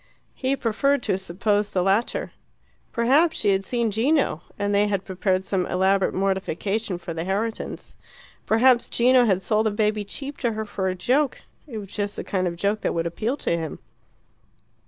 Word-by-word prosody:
He 265 +1 0
preferred 275 +3 +1
to 185 - +1
suppose 205 +3 0
the 180 - 0
latter. 195 +5 0 0.6
Perhaps 285 +8 +3
she 205 - +2
had 195 0 +1
seen 235 +1 0
Gino, 245 - +1 0.2
and 205 0 -1
they 205 +1 +3
had 200 -2 -1
prepared 190 0 0
some 190 -1 -1
elaborate 190 +1 +2
mortification 195 +1 -1
for 170 -1 -6
the 165 0 -3
Herritons. 205 +5 -3 0.5
Perhaps 240 +2 +4
Gino 250 +1 +4
had 190 -4 +1
sold 215 +2 +2
the - - +1
baby 210 0 0
cheap 275 +7 -6
to 235 -3 0
her 220 0 -3
for 195 -2 -3
a 185 - -2
joke: 260 +9 +1 0.3
it 235 -6 -7
was 200 -3 -7
just 205 0 -3
the - - -4
kind 185 -2 -1
of 170 - -3
joke 200 +4 0
that - - -1
would 165 0 0
appeal 220 - -2
to 170 - 0
him. 160 -3 -4
205 Hz, 180 wpm, -24 LUFS, 190-235 Hz, 0.6 s, Perhaps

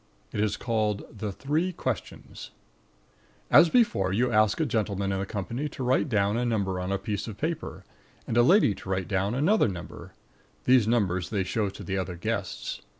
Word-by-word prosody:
It - - -3
is 105 0 0
called 110 -3 -1
THE 105 0 -3
THREE 155 - -1
QUESTIONS - - -5 1.0
As 170 - +8
before, 130 - +2
you 120 +5 +1
ask 110 +2 +3
a 160 - +2
gentleman 100 -6 -1
in 95 - -1
the 100 - -3
company 115 - -3
to 135 - -6
write 130 +4 +2
down 105 -1 +1
a 120 - 0
number 100 -6 -1
on 90 +1 -3
a 100 - +1
piece 100 +1 -4
of 105 -3 -7
paper, 160 +4 -4 0.4
and - - -3
a 120 - +6
lady 165 - +5
to 95 - -11
write 95 -1 -1
down 100 +3 0
another 175 - +3
number. 90 -4 -8 0.5
These 125 -4 +4
numbers 95 -7 +1
they 100 -3 0
show 100 +2 -1
to 95 - -10
the 95 0 -2
other 90 -1 -4
guests. 100 +2 -4
105 Hz, 190 wpm, -27 LUFS, 95-125 Hz, 1.0 s, As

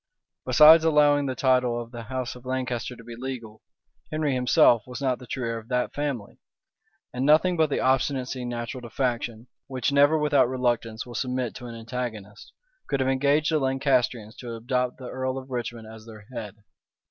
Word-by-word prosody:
Besides, 160 +1 +8
allowing 145 -2 +4
the 130 - -2
title 125 -2 +2
of 120 0 -8
the 120 -1 -7
house 125 +2 -4
of 125 - -13
Lancaster 130 -1 -3
to 115 - -14
be 120 0 -9
legal, 120 -4 -7 0.5
Henry 155 -2 0
himself 125 -2 +4
was 125 -1 -7
not 130 -3 0
the 125 - -12
true 125 -3 -3
heir 115 0 -2
of 110 - -16
that 125 0 -1
family; 140 -8 -4 0.7
and 125 +1 -2
nothing 160 +5 +4
but 160 -2 +2
the - - -1
obstinacy 130 -1 0
natural 120 +1 -5
to 120 - -9
faction, 120 -2 -2 0.2
which 130 -1 -1
never 145 +2 +5
without 145 -4 +3
reluctance 120 -3 -1
will 120 - -10
submit 125 0 -2
to 125 - -9
an 115 - -8
antagonist, 115 -3 -6 0.4
could 140 - -1
have 130 0 +1
engaged 140 +4 +2
the 155 - +2
Lancastrians 130 -5 0
to 120 -2 -7
adopt 125 +2 -1
the 130 - -9
earl 130 +1 -3
of 130 0 -8
Richmond 120 -2 -4
as 110 0 -12
their 110 -2 -12
head. 105 -4 -6
125 Hz, 185 wpm, -26 LUFS, 120-135 Hz, 0.7 s, Besides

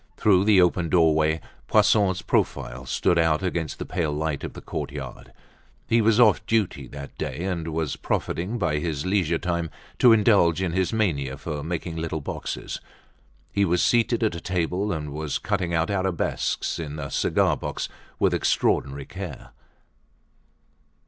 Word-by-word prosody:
Through 95 -2 +4
the 105 -3 +6
open 90 -1 +1
doorway, 80 -2 +3 0.3
Poisson's 95 -3 +3
profile 65 +2 -1
stood 85 +7 +2
out 80 0 +2
against 85 -4 -2
the - - -5
pale 80 -3 -1
light 75 -1 -2
of - - -5
the - - -8
courtyard. 70 -3 -6 0.6
He 115 0 +3
was 110 +1 +3
off 110 -4 +5
duty 100 - 0
that 70 +2 -9
day 75 +6 -3
and 90 -4 -2
was 80 -2 -2
profiting 95 +8 -2
by 85 -8 0
his 75 -2 -3
leisure 95 -4 +1
time 85 -2 -2 0.3
to 125 - +7
indulge 100 -6 +4
in 95 -3 -1
his 95 +1 0
mania 75 -12 0
for 75 -1 -5
making 85 +1 -4
little 80 -1 -2
boxes. 70 - -5 0.7
He 100 - +2
was 90 -2 +2
seated 120 0 +2
at 110 - +2
a 85 - -6
table 90 +3 -1
and 75 -4 -4
was 75 -1 -2
cutting 95 -4 -1
out 85 +2 +1
arabesques 95 -4 -1
in 75 -2 -5
a 70 -2 -5
cigar - - +2
box - - -4 0.3
with - - +2
extraordinary 70 0 +1
care. 90 -6 -8
85 Hz, 155 wpm, -25 LUFS, 75-95 Hz, 0.7 s, to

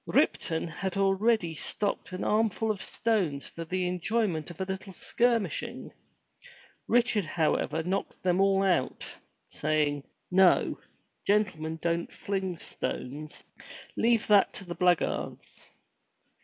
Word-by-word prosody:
Ripton 160 0 +1
had 190 +3 -4
already 195 -2 +2
stocked 200 +6 -2
an 185 - -4
armful 220 0 +1
of 200 -3 -4
stones 190 -9 0
for 165 - -7
the 180 +2 -1
enjoyment 180 -2 -1
of 170 - -11
a 190 - -1
little 190 0 -5
skirmish 235 +2 +1
ing. - - -8 1.0
Richard 235 -6 +3
however 160 0 0
knocked 190 +3 -3
them 185 +1 +2
all 195 0 +4
out, 180 -9 +1 0.4
saying, 150 -1 0 0.3
"No! 190 0 +4 0.5
Gentlemen 185 -6 +1
don't 170 0 0
fling 190 -3 -3
stones. 150 0 -5 0.5
Leave 230 -1 +3
that 205 -2 +5
to 195 - -6
the 175 - -5
blackguards!" 180 -1 -1
185 Hz, 120 wpm, -29 LUFS, 165-205 Hz, 1.0 s, that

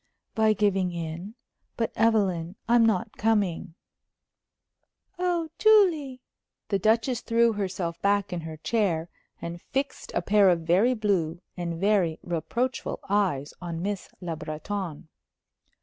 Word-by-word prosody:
"By 220 -1 +3
giving 195 -3 +1
in. 170 +5 -6 0.4
But, 225 -1 0
Evelyn, 195 -6 +1
I'm 235 0 +5
not 220 0 +1
coming." 205 -7 0 1.4
"Oh, 350 -3 0
Julie!" 340 - +4 0.5
The 200 -2 +1
Duchess 225 +4 +2
threw 230 0 +3
herself 185 -4 -3
back 200 -1 +1
in 175 - -3
her 160 -1 -7
chair 170 -4 0 0.3
and 170 0 -5
fixed 275 +1 -3
a 175 - 0
pair 200 0 +5
of 175 -2 +2
very 190 +10 +3
blue 185 -7 0 0.2
and 170 -2 -4
very 195 -5 +2
reproachful 235 +10 -2
eyes 185 -9 +1
on 170 -1 -4
Miss 200 -1 -3
Le 170 -2 -3
Breton. 160 +2 -5
200 Hz, 125 wpm, -27 LUFS, 170-225 Hz, 1.4 s, I'm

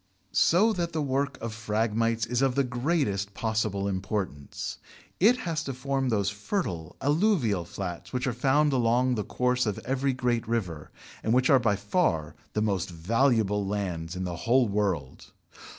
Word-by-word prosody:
So 210 +7 +4
that 170 -4 -2
the 160 - 0
work 140 +1 -1
of 115 -1 -4
Phragmites 115 0 0
is 120 +2 -1
of 135 -2 +2
the 140 - +3
greatest 125 - -1
possible 110 -3 -1
importance: 95 -6 -4 0.4
it 230 +7 +5
has 165 -6 -2
to 135 - -4
form 135 0 -1
those 100 -3 +1
fertile 105 - -3
alluvial 145 - +2
flats 90 -1 -6
which 125 -1 -1
are 130 - 0
found 140 +4 +2
along 125 +1 +2
the 105 -4 -1
course 125 +1 0
of 105 - -1
every 135 +1 0
great 125 -3 -1
river, 90 -10 -2 0.3
and 110 - +1
which 130 +2 +3
are 135 - +7
by 115 -4 +2
far 100 - 0 0.2
the 105 - +1
most 100 -3 0
valuable 105 +3 +1
lands 95 -5 -3
in 95 - -3
the 90 -2 -4
whole 120 +6 +3
world. 95 -10 -2
115 Hz, 165 wpm, -27 LUFS, 100-135 Hz, 0.4 s, are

